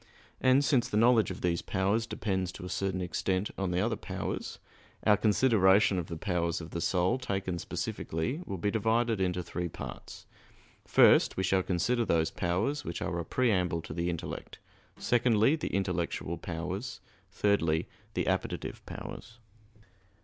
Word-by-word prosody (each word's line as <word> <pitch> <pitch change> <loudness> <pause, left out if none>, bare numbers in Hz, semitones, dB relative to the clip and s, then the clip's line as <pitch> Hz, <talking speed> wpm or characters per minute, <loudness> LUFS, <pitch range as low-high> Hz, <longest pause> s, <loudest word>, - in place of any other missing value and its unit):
And 130 +2 +4
since 130 -5 +2
the 105 - 0
knowledge 115 -2 +5
of - - -6
these 85 -1 0
powers 100 +4 0
depends 95 -5 -2
to 90 - -8
a - - -6
certain 95 -1 -1
extent 95 +2 -1
on 95 -1 -2
the 90 +1 +1
other 110 +2 +1
powers, 95 -3 -5 0.5
our 105 - +6
consideration 105 -3 +4
of 85 - -4
the 85 - -5
powers 85 -2 -1
of 80 -1 -9
the 85 - -3
soul 90 +8 +1
taken 95 -7 -2
specifically 100 - -3
will 95 - -3
be 100 +4 0
divided 115 0 +1
into 90 -1 0
three 85 +1 -3
parts: - - -9 0.6
first, - - +5
we 95 - 0
shall 95 0 +2
consider 95 +7 +1
those 80 -6 +1
powers 105 +12 -1
which 85 - -4
are 85 -2 -2
a - - -2
preamble 90 -6 +1
to - - -7
the 85 +1 -1
intellect; 85 -2 -5 0.4
secondly, 120 +2 +3
the 155 - -4
intellectual 90 -3 -1
powers; 90 +7 -5 0.3
thirdly, 80 -6 +1 0.3
the - - 0
appetitive - - -2
powers. 115 - -8
95 Hz, 155 wpm, -30 LUFS, 90-110 Hz, 0.6 s, our